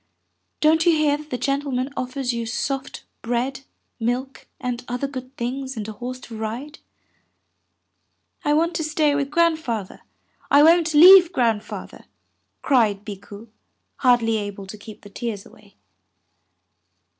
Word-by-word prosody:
Don't 315 +1 +4
you 340 - +6
hear 305 -2 +2
that 300 +1 -10
the 250 - -3
gentle 280 +2 -1
man 255 +2 -2
offers 255 0 -3
you 235 -1 -3
soft 270 +4 -4 0.2
bread, 245 +3 -2 0.4
milk, 245 +4 -3
and 250 -2 -4
other 250 +3 -3
good 255 -1 -9
things 260 +2 -4
and 215 -1 -4
a - - -5
horse 250 +4 -7
to 230 - -10
ride?" 235 +8 -6 1.6
"I 295 - +2
want 335 +2 +1
to 320 - -2
stay 305 -1 +1
with 280 -1 -1
Grandfather, 315 - 0 0.5
I 285 +1 +6
won't 330 0 +4
leave 360 +2 +9
Grandfather," 230 - -2 0.6
cried 215 -7 +2
Bikku, 205 +2 -10 0.5
hardly 240 -3 +3
able 205 -2 -6
to 195 - -9
keep 215 0 -12
the 205 - -13
tears 220 -3 -5
away. - - -19
255 Hz, 140 wpm, -22 LUFS, 225-295 Hz, 1.6 s, leave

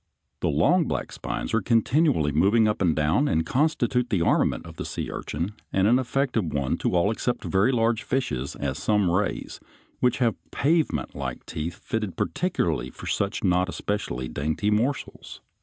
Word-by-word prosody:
The - - 0
long 155 - +3
black - - -3
spines - - -4
are 115 - +3
continually 120 - +2
moving 100 +9 +4
up 105 - -1
and 85 -5 +3
down, 80 - +2
and 80 - +1
constitute 125 - +1
the 95 -6 +1
armament - - +1
of - - -11
the - - -3
sea - - -4
urchin, 85 +5 -3 0.2
and 95 +1 +3
an 120 +4 +5
effective 130 -2 0
one 70 -4 -1
to - - -1
all 90 +4 +3
except 120 +2 -2
very 95 +7 +2
large 115 -2 +1
fishes, 105 - -2
as 70 -2 -3
some 105 -4 +2
rays, 100 +4 -1 0.4
which 125 - +2
have 120 -4 +1
pavementlike 140 - -1
teeth 80 +2 -4
fitted 110 -5 -4
particularly 85 - -1
for - - -11
such 100 +1 -1
not 90 -1 +2
especially 80 -12 -3
dainty 80 +11 -1
morsels. 120 +7 -2
105 Hz, 165 wpm, -25 LUFS, 80-125 Hz, 0.4 s, an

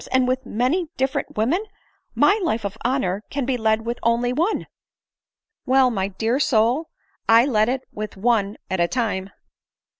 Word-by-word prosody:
and 260 -1 +3
with 255 0 -1
many 265 - 0
different 265 -1 -2
women? 280 - +1 0.5
My 405 +3 +4
life 235 - -1
of 200 +1 -3
honor 215 -6 0
can 280 -2 -2
be 260 0 0
led 220 -1 +1
with 235 +1 -3
one 235 +1 +2
only." 345 +9 0 0.5
" 450 - -66
Well, 260 -1 +4
my 195 -4 -1
dear 225 +6 -1
soul, 250 +5 +2 0.4
1 225 - +7
only 265 - 0
led 215 0 +3
it 260 +1 -1
with 215 -1 -6
one 210 -1 +1
at 190 -1 -2
a 170 - +3
time." 200 -4 -2
240 Hz, 175 wpm, -22 LUFS, 215-265 Hz, 0.5 s, 1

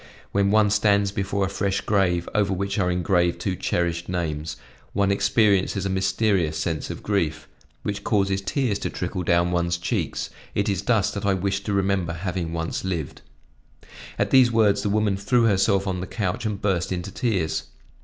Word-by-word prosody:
When 100 0 +2
one 105 0 +4
stands 100 -1 +3
before 100 0 -1
a - - -2
fresh 100 0 -1
grave, 90 -4 +1
over 100 -2 +2
which 100 +2 -1
are 90 -2 +2
engraved 90 -1 +1
two 95 -2 -1
cherished 85 -1 -1
names, 80 -4 -3 0.4
one 100 0 +2
experiences 100 -1 +2
a 95 - -1
mysterious 95 -4 +1
sense 80 -1 -2
of - - -7
grief, 80 -7 -1 0.4
which 105 0 -3
causes 100 -2 +1
tears 105 +1 -1
to - - -2
trickle 90 - -3
down 85 0 +2
one's 85 0 0
cheeks; 85 - -2 0.2
it 100 +1 +1
is 100 -3 0
thus 105 -1 +2
that 100 0 -3
I 100 - +3
wish 95 +1 -1
to 105 - -1
remember 95 -3 0
having 85 0 -3
once 80 0 -3
lived." 85 -7 -4 1.0
At - - 0
these 130 -2 +6
words 110 -3 +3
the 105 - -1
woman 105 -1 +1
threw 120 +4 +2
herself 100 -2 +3
on 95 -2 -2
the 95 - -5
couch 105 +1 -2
and 105 -2 -3
burst 95 -4 0
into 90 +1 -3
tears. 95 -11 -1
95 Hz, 180 wpm, -24 LUFS, 90-100 Hz, 1.0 s, these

